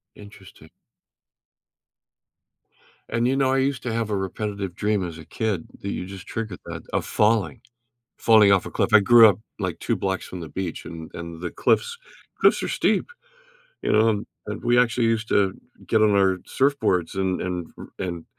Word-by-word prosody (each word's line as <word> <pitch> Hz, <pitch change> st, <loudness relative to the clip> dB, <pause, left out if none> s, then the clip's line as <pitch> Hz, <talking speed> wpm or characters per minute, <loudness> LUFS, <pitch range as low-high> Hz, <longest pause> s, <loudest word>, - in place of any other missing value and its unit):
Interesting. 105 Hz, -2 st, -15 dB, 2.4 s
And, 115 Hz, +1 st, +1 dB
you 130 Hz, -, +1 dB
know, 135 Hz, -1 st, +2 dB
I -, -, +2 dB
used 135 Hz, -1 st, 0 dB
to 120 Hz, -, -3 dB
have 115 Hz, -1 st, -1 dB
a 105 Hz, -, 0 dB
repetitive 100 Hz, -1 st, -4 dB
dream 105 Hz, -2 st, 0 dB
as 80 Hz, -2 st, -9 dB
a 80 Hz, -, -11 dB
kid, 105 Hz, -2 st, -3 dB
that 100 Hz, -, -4 dB
you 90 Hz, -, -4 dB
just 95 Hz, 0 st, -10 dB
triggered 110 Hz, -5 st, -5 dB
that, -, -, -7 dB
of -, -, 0 dB
falling 105 Hz, -9 st, +1 dB, 0.6 s
falling 110 Hz, -3 st, +6 dB
off 95 Hz, -2 st, +4 dB
a -, -, -6 dB
cliff. -, -, 0 dB
I 110 Hz, -, +9 dB
grew 115 Hz, +2 st, +8 dB
up, 100 Hz, -, +1 dB, 0.2 s
like, -, -, -3 dB
2 -, -, -1 dB
blocks 95 Hz, -1 st, -2 dB
from 90 Hz, -, -8 dB
the 80 Hz, -, -7 dB
beach, 90 Hz, +2 st, -5 dB
and 80 Hz, -1 st, -9 dB
and 85 Hz, -1 st, -7 dB
the 90 Hz, -1 st, -4 dB
cliffs 475 Hz, 0 st, +1 dB, 0.4 s
cliffs -, -, +4 dB
are -, -, -2 dB
steep. -, -, 0 dB, 0.7 s
You -, -, 0 dB
know, 110 Hz, +1 st, +4 dB
and 105 Hz, -2 st, -1 dB, 0.2 s
and -, -, -6 dB
we 120 Hz, 0 st, +3 dB
actually 120 Hz, -1 st, +2 dB
used 115 Hz, -1 st, 0 dB
to 95 Hz, -2 st, +2 dB, 0.3 s
get 110 Hz, -, +2 dB
on 110 Hz, -, +5 dB
our 95 Hz, -1 st, +3 dB, 0.2 s
surfboards 130 Hz, -, +1 dB
and 95 Hz, -1 st, -1 dB
and 90 Hz, -2 st, -3 dB
r -, -, -9 dB
and 85 Hz, -3 st, -4 dB
100 Hz, 185 wpm, -24 LUFS, 90-115 Hz, 2.4 s, I